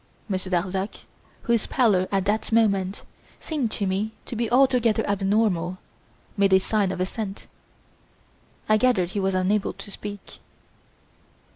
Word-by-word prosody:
Monsieur 190 -2 -3
Darzac, 190 +2 -2 0.4
whose 235 -3 +1
pallor 205 -8 +2
at 195 -1 +1
that 210 +3 0
moment 200 -4 +2 0.4
seemed 290 -8 -2
to 205 - -2
me 200 +3 -1
to - - -6
be 230 0 -1
altogether 250 -3 +3
abnormal, 195 -3 +1 0.6
made 200 -2 +3
a 190 - +7
sign 200 0 0
of 185 - -5
assent. 195 +2 -4 1.2
I 215 - +5
gathered 215 -7 +2
he 200 - -3
was 195 -1 0
unable 195 +2 +1
to 200 - -10
speak. 205 0 -8
200 Hz, 135 wpm, -24 LUFS, 190-220 Hz, 1.2 s, a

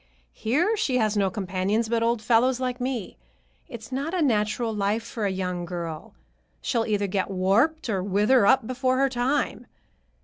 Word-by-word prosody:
Here 320 - +1
she 285 -12 0
has 215 -3 +1
no 200 -2 +2
companions 190 +4 -1
but 230 0 0
old 230 -1 0
fellows 245 +2 +3
like 250 -1 -3
me. 250 -5 -3 0.5
It's 225 0 -9
not 280 +7 -2
a 360 - 0
natural 220 -2 0
life 210 +2 0
for 225 -2 -3
a - - -1
young 180 -2 -3
girl. 170 -3 -6 0.4
She'll 230 -3 -1
either 205 -2 0
get 195 0 -1
warped, 210 - +1
or 200 -5 -1
wither 205 +4 +3
up 265 0 +4
before 255 +1 0
her 275 +1 +3
time. 260 +3 -1
225 Hz, 170 wpm, -25 LUFS, 200-255 Hz, 0.5 s, up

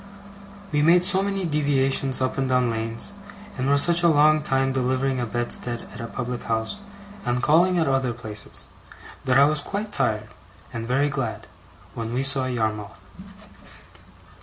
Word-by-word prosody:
We 150 -1 +1
made 175 +3 +5
so 190 0 +4
many 195 -1 -2
deviations 135 -3 0
up 130 - 0
and 135 -1 0
down 125 -2 +2
lanes, 115 - -4 0.4
and 130 0 -1
were 140 - +4
such 170 +4 +4
a 170 - +4
long 155 -1 +4
time 135 -2 0
delivering 130 0 0
a 120 - -2
bedstead 120 0 -1
at - - -8
a 115 - -5
public 125 0 -5
house, 110 - -2 0.4
and 125 +1 -1
calling 175 +4 +4
at 165 - +1
other 135 -2 +1
places, 110 -4 -2 0.6
that 130 -1 +3
I 140 - +7
was 150 +1 +2
quite 205 +7 -5
tired, 110 - -1 0.4
and 115 -1 -5
very 140 +4 +1
glad, 135 -5 -4 0.5
when 115 +1 -4
we 130 - 0
saw 135 -1 +2
Yarmouth. 105 -6 -3
130 Hz, 160 wpm, -24 LUFS, 120-150 Hz, 0.6 s, I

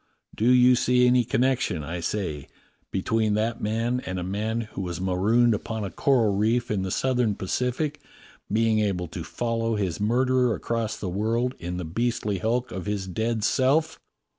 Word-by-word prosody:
Do 115 +3 +1
you 125 0 +6
see 125 0 +3
any 125 0 +4
connection, 120 - 0
I 85 +3 -4
say, 85 -6 -3 0.4
between 110 +2 0
that 115 +2 -1
man 115 +4 0
and 95 0 -4
a 90 - -3
man 105 +5 -2
who 105 -3 -7
was 90 -2 -4
marooned 105 +6 +3
upon 110 +1 -3
a 95 - -4
coral 120 -7 +2
reef 110 +4 +1
in 100 -3 0
the 95 - -2
Southern 125 -1 +1
Pacific 125 +10 -2 0.5
being 110 0 +2
able 95 -4 -1
to 85 - -6
follow 115 +5 -2
his 95 -5 -2
murderer 125 +2 +2
across 115 -2 -2
the 100 - -5
world 115 +7 0
in 90 +1 -4
the 90 - -4
beastly 105 +2 -1
hulk 120 +5 -1
of 95 +1 -5
his 105 -2 -2
dead 110 +4 -2
self 145 +8 +2
110 Hz, 170 wpm, -25 LUFS, 95-120 Hz, 0.5 s, you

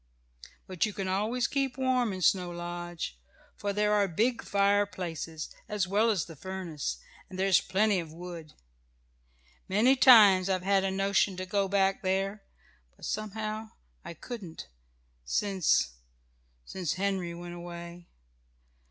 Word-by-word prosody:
"But 185 -3 -2
you 210 - -6
can 195 -1 -4
always 215 +6 0
keep 275 -1 -1
warm 255 -3 +1
in 185 -1 -4
Snow 180 +1 +3
Lodge, 175 - -6 0.4
for 205 - -3
there 210 +1 +1
are 205 -1 +3
big 225 +8 0
fireplaces, 185 -6 -1 0.2
as 205 -3 -1
well 210 +4 +3
as 190 -9 +1
the 165 - -11
furnace, 165 - -5 0.3
and 185 - -8
there 190 - +1
is 195 -2 +5
plenty 205 0 +2
of 165 -2 -6
wood. 170 -2 -9 1.2
Many 225 +8 +4
times 210 -8 +7
I've 185 -1 0
had 195 0 +3
a 195 - +1
notion 195 0 +1
to 185 - -4
go 195 +1 0
back 195 0 +1
there, 195 +2 -1 0.5
but - - -10
somehow 215 +1 -4 0.3
I 170 - -8
couldn't, 185 - -8 0.5
since 180 - +1 0.7
since 180 - -3
Henry 185 -3 -2
went 175 0 -8
away. 170 0 -9
190 Hz, 140 wpm, -29 LUFS, 175-210 Hz, 1.2 s, times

